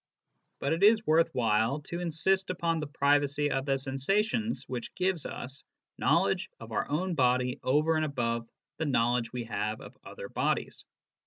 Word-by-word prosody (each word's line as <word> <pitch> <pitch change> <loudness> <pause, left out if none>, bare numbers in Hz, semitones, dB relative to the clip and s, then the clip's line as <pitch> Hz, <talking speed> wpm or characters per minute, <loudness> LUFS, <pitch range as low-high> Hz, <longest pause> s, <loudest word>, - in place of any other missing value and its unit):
But 140 - 0
it 165 - -2
is 215 +2 +5
worth 165 +1 +4
while 115 +3 +1
to 170 +4 -6
insist 180 +3 +1
upon 170 -2 0
the 150 - -4
privacy 145 0 +2
of 135 +1 -1
the 135 -1 +2
sensations 200 - 0
which 125 -2 -5
gives 185 -3 0
us 135 +3 -6 0.4
knowledge - - +2
of - - -10
our - - -1
own 175 +5 -1
body 125 -2 +2
over 150 +5 +2
and 155 - +1
above 115 -5 -2 0.3
the 160 - -1
knowledge 120 -3 +1
we 125 -1 -4
have 110 -1 -3
of - - -12
other - - -8
bodies. - - -2
145 Hz, 165 wpm, -29 LUFS, 125-165 Hz, 0.4 s, is